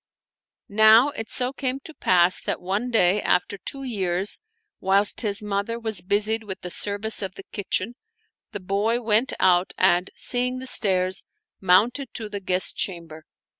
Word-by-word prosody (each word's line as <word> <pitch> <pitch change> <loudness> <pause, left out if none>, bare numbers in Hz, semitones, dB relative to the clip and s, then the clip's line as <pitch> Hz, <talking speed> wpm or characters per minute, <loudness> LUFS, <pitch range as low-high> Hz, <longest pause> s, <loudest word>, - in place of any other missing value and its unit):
Now 220 +5 +6
it 225 -6 -6
so 255 +1 0
came 265 -1 -3
to 320 - -11
pass 180 -8 +3
that - - -3
one 200 +7 -2
day 205 -3 +3
after 180 +2 0
two 275 +6 -6
years, 195 -5 0 0.4
whilst 195 +2 +2
his 210 -1 -2
mother 205 +3 -2
was 220 -5 -4
busied 210 +4 0
with 195 -3 -8
the 180 - -7
service 205 +3 -3
of 190 -2 -5
the 195 - -10
kitchen 205 +2 -2 0.6
the 205 - -6
boy 200 +5 0
went 225 +3 +2
out 180 0 +3
and, 180 0 +3
seeing 250 +1 0
the 260 - -7
stairs, 190 -6 +2 0.4
mounted 225 +9 +2
to 220 -2 -6
the 205 - -4
guest 185 -1 0
chamber. 165 -4 -4
205 Hz, 160 wpm, -23 LUFS, 185-230 Hz, 0.6 s, Now